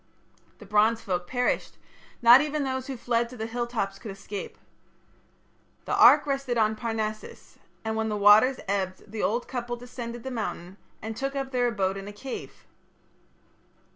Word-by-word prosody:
The 210 - -13
Bronze 215 +3 +3
folk 180 -3 -3
perished: 245 +4 -1 0.5
not 240 +3 +9
even 300 0 -1
those 260 0 -3
who 270 -2 -5
fled 235 0 0
to 250 - -11
the 220 - -3
hilltops 225 -4 -3
could 225 - -8
escape. 195 +1 -7 1.3
The - - -2
ark - - +7
rested 275 -3 -1
on 220 -1 +2
Parnassus, 215 -1 -5 0.3
and 220 0 -1
when 220 0 -1
the 210 - -1
waters 210 +6 +6
ebbed 195 0 -3
the 220 -1 -4
old 235 +4 0
couple 240 -1 -4
descended 240 -1 -8
the 265 - -5
mountain 195 -5 -5 0.3
and 220 0 -5
took 275 +4 -3
up 270 -1 -3
their 245 -2 +2
abode 195 -4 -1
in 195 0 -7
a 205 - -8
cave. 255 +5 -8
230 Hz, 165 wpm, -27 LUFS, 210-245 Hz, 1.3 s, not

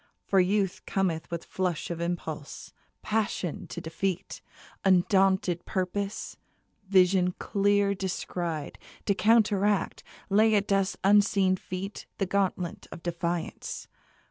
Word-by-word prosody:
For 195 - +3
Youth 190 0 +1
cometh 175 -5 -1
With 170 -1 -4
flush 180 -3 -2
of 170 0 -4
impulse, 165 -4 -5 0.3
passion 210 -6 -1
to - - -6
defeat, 180 +3 -3 0.4
Undaunted 190 -1 +3
purpose, 195 +1 -3 0.5
vision 185 -1 +4
clear 200 0 +2
descried, 175 -5 -4 0.3
To 200 - +3
counteract, 205 -1 +2 0.3
lay 215 +2 +4
at 200 -1 +2
Death's 195 -1 +1
unseen 200 -1 +4
feet 185 +2 -6
The 195 - 0
gauntlet 185 -2 -1
of 170 - -9
defiance. 170 -1 -3
190 Hz, 110 wpm, -28 LUFS, 175-200 Hz, 0.5 s, vision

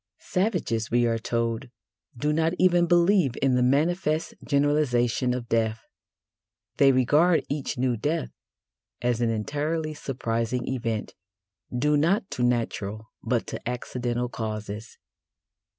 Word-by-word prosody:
Savages, 180 - -1
we 120 0 +3
are 115 -1 +1
told, 115 +2 -2 0.5
do 150 +5 0
not 160 +2 +1
even 175 -1 +4
believe 175 - +4
in 135 -1 +2
the 125 - +3
manifest 155 +5 +1
generalisation 140 -4 +2
of 125 -1 -3
death: 110 -1 0 0.9
they 140 -1 +6
regard 150 +7 +3
each 145 -3 -3
new 125 -1 +1
death 150 +8 -2 0.7
as 120 -1 +1
an 120 - +2
entirely 150 +8 -2
surprising 120 -4 -2
event, 115 -4 -2 0.6
due 145 +4 +2
not 190 +7 +1
to - - -3
natural, 110 -3 -1
but - - 0
to - - -5
accidental 125 0 -2
causes. 110 -2 -6
125 Hz, 120 wpm, -26 LUFS, 115-150 Hz, 0.9 s, they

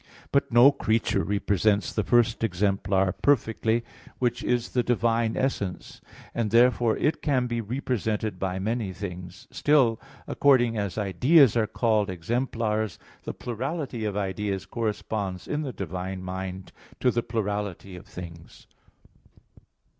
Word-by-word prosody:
But 140 -1 +1
no 120 +4 +8
creature 110 -6 0
represents 100 0 +1
the 105 - 0
first 120 -1 +2
exemplar 95 -1 +1
perfectly, 115 -3 +1 0.3
which 120 -1 -1
is 120 -1 0
the 125 - +1
divine 115 -1 +1
essence; 100 -9 -3 0.3
and, 115 -2 -1
therefore, 120 0 +4
it 150 - 0
can 130 -4 +1
be 120 -1 -2
represented 110 -4 -2
by 95 -1 -2
many 105 0 -2
things. 90 -1 -8
Still, 130 -7 +3 0.2
according 125 -5 +3
as 100 -3 -3
ideas 120 - +4
are 110 -2 +2
called 110 -4 +1
exemplars, 110 +2 -2 0.3
the - - -4
plurality 130 0 -4
of 105 -2 -2
ideas 95 -1 -2
corresponds 105 -4 -3
in 150 - -1
the 140 -4 -3
divine 95 -1 -5
mind 95 0 -6 0.3
to 125 - +3
the 120 - 0
plurality 105 -4 -3
of 90 +4 -12
things. 85 -4 -11
110 Hz, 130 wpm, -26 LUFS, 95-120 Hz, 0.3 s, no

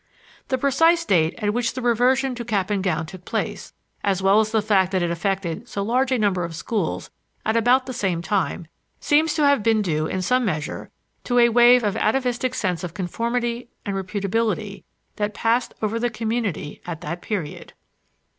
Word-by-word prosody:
The 260 - 0
precise 330 +6 +3
date 165 - +2
at 210 -2 -1
which 240 +1 -1
the 260 - -3
reversion 250 +3 +2
to 240 -1 -5
cap 210 -4 -1
and 200 -2 0
gown 165 -4 0
took 180 +2 -11
place, - - -3 0.3
as 195 -2 +1
well 195 +2 +4
as 220 -1 +1
the 220 -1 +1
fact 195 -3 +2
that 185 -2 +1
it 170 - 0
affected 190 +3 -2
so 200 - -3
large 255 +5 +1
a 260 - +3
number 200 -5 +1
of 170 -1 -5
schools 185 +1 -3 0.3
at 220 - +1
about 245 +3 +4
the 255 - -5
same 185 -8 -1
time, 180 -3 -1 0.3
seems 305 +2 +2
to 300 - +3
have 280 -5 +4
been 220 0 +2
due 155 -4 0
in 185 +2 -2
some 250 +5 +2
measure 155 -8 -3 0.4
to 245 - 0
a 235 0 +6
wave 240 +1 +6
of 205 -1 0
atavistic 250 +2 0
sense 185 -7 -1
of 175 -1 -6
conformity 235 +5 -2 0.2
and 200 -2 -2
reputability 200 +2 -2 0.3
that 210 0 -2
passed 230 +2 0
over 220 +2 0
the 240 +1 0
community 220 -9 -3
at 165 -3 -5
that 170 +3 -5
period. 185 -9 -5
215 Hz, 190 wpm, -23 LUFS, 185-245 Hz, 0.4 s, a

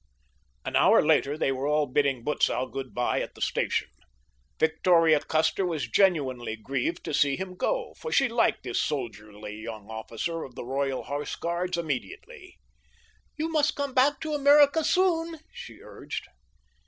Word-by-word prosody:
An - - -3
hour - - +5
later 145 +2 +2
they 135 - +1
were 135 +1 -2
all 150 0 +2
bidding 135 -2 0
Butzow 130 -2 +1
good 130 0 -7
bye 125 - 0
at - - -6
the - - -14
station. - - 0 0.7
Victoria 160 0 +4
Custer 160 +6 0
was 160 -8 -2
genuinely 130 - +1
grieved 135 +8 -3
to - - -5
see 140 -1 +2
him 185 -1 -6
go, - - -2
for 475 - -6
she 275 - +4
liked 235 -1 +1
this 125 -2 -1
soldierly 105 -5 -5
young 110 -2 -8
officer 115 +9 -4
of 130 -5 -9
the 125 - -7
Royal 135 +1 -2
Horse 145 +1 -4
Guards 175 +1 -2
immensely. 170 - -6 0.8
"You 320 +1 -2
must 305 -1 +2
come 280 -2 -3
back 275 +3 +3
to 310 -1 -3
America 290 +2 +5
soon," 335 -1 +1 0.2
she 480 0 -10
urged. - - -7
155 Hz, 155 wpm, -27 LUFS, -, 0.8 s, hour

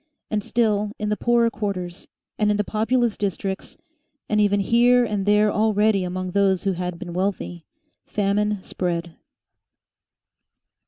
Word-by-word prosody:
And 210 -2 0
still 210 -3 0
in 210 0 -2
the 210 - +1
poorer 235 +1 +2
quarters, 195 -4 -4 0.3
and 210 -1 +3
in 210 - +2
the 210 - +1
populous 225 +2 0
districts, 195 -1 -3 0.5
and 210 0 +2
even 205 -1 +3
here 240 +4 +4
and 205 -3 -2
there 210 0 +4
already 210 -2 +2
among 185 0 -3
those 195 -1 +2
who 195 - +1
had 180 -1 -4
been 175 0 -7
wealthy, 180 -2 -3 0.4
famine 205 0 0
spread. 170 -2 -3
205 Hz, 140 wpm, -23 LUFS, 185-215 Hz, 0.5 s, here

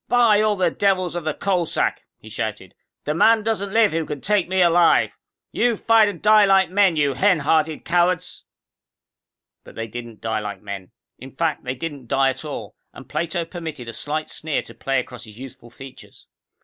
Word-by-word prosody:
"By 230 -4 +4
all 215 -1 +2
the 180 -3 +1
devils 185 -2 0
of 175 -2 -5
the 155 - 0
Coal 180 -4 0
Sack," - - -1 0.2
he - - -16
shouted, - - -5 0.3
"the 150 - -1
man 220 +7 +4
doesn't 205 -3 -2
live 225 -1 +4
who 165 0 -1
can 150 -2 -5
take 205 +2 0
me 190 0 0
alive! 175 -1 +4 0.4
You'll 240 -2 +1
fight 225 -2 +4
and 185 -5 -7
die 215 0 +5
like 195 -2 +3
men, 195 -3 +3
you 145 -2 +1
hen 185 -3 +2
hearted 155 +1 0
cowards...."_ 180 0 0 1.2
But - - -15
they 115 - -4
didn't 115 0 -9
die 110 -1 -2
like 105 -2 -6
men. 100 -2 -7 0.3
In 130 - -10
fact, 160 0 -1
they 125 +1 -3
didn't 140 -2 -7
die 135 +2 +2
at 130 - -8
all, 125 -10 -7 0.2
and - - -13
Plato 170 0 -2
permitted 160 -7 -7
a 115 - -6
slight 155 +4 -3
sneer 155 -2 -3
to - - -13
play 135 -1 -1
across 125 -1 -8
his 105 -1 -14
youthful 125 -2 -11
features. 130 +2 -14
165 Hz, 195 wpm, -22 LUFS, 135-195 Hz, 1.2 s, die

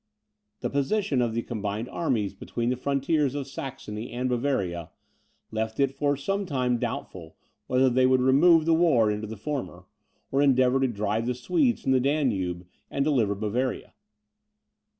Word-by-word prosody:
The - - -1
position 140 +1 +1
of 115 -2 -1
the 115 - -1
combined 105 0 -4
armies 115 - -1
between 120 +4 -3
the - - 0
frontiers 140 +2 0
of 140 -2 -3
Saxony 130 -5 -7
and 125 +2 -2
Bavaria, 100 - -1 0.6
left 110 +1 -3
it 135 -1 +3
for 145 0 0
some 195 +7 -2
time 125 -5 0
doubtful - - -5 0.3
whether 130 +1 +3
they 130 0 +3
would 130 0 +4
remove 155 +6 +5
the 165 - +4
war 150 -10 +4
into 105 +1 -3
the 110 +1 -7
former, 125 -8 -5 0.5
or 135 - +2
endeavour 130 -2 +4
to 135 - +2
drive 110 0 -1
the 125 - 0
Swedes 255 - +1
from 135 - +1
the 130 - +4
Danube, 110 - 0 0.2
and 140 - -1
deliver 120 -9 +2
Bavaria. 115 +5 -2
130 Hz, 160 wpm, -26 LUFS, 110-140 Hz, 0.6 s, remove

